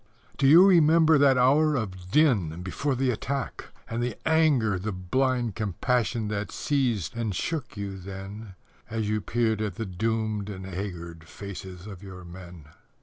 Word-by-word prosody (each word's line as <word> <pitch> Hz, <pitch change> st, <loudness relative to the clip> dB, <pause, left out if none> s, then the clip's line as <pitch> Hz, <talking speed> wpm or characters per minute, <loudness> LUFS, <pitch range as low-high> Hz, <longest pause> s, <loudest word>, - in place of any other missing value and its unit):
Do 135 Hz, -, +2 dB
you 165 Hz, +7 st, +9 dB
remember 160 Hz, -4 st, +5 dB
that 140 Hz, -2 st, +5 dB
hour 145 Hz, +5 st, +4 dB
of 95 Hz, -7 st, -4 dB
din 100 Hz, -, +2 dB
before 135 Hz, +9 st, -2 dB
the 130 Hz, 0 st, +1 dB
attack 135 Hz, +3 st, -4 dB, 0.2 s
And 115 Hz, +1 st, -3 dB
the 120 Hz, 0 st, -2 dB
anger, 145 Hz, -, +3 dB
the 105 Hz, +4 st, -3 dB
blind 120 Hz, +5 st, 0 dB
compassion 110 Hz, +3 st, -1 dB
that 105 Hz, 0 st, -3 dB
seized 125 Hz, -, -1 dB
and 110 Hz, -5 st, -2 dB
shook 140 Hz, -, -3 dB
you 100 Hz, -1 st, -5 dB
then 95 Hz, +2 st, -8 dB, 0.3 s
As 110 Hz, -1 st, -2 dB
you 105 Hz, 0 st, 0 dB
peered 110 Hz, -1 st, 0 dB
at 105 Hz, -4 st, -2 dB
the 115 Hz, -, -4 dB
doomed 110 Hz, +1 st, -2 dB
and 95 Hz, -2 st, -7 dB
haggard 85 Hz, -4 st, -6 dB
faces 95 Hz, -1 st, -9 dB
of 100 Hz, -4 st, -9 dB
your 95 Hz, -2 st, -10 dB
men? 85 Hz, -3 st, -11 dB
110 Hz, 155 wpm, -26 LUFS, 95-130 Hz, 0.3 s, you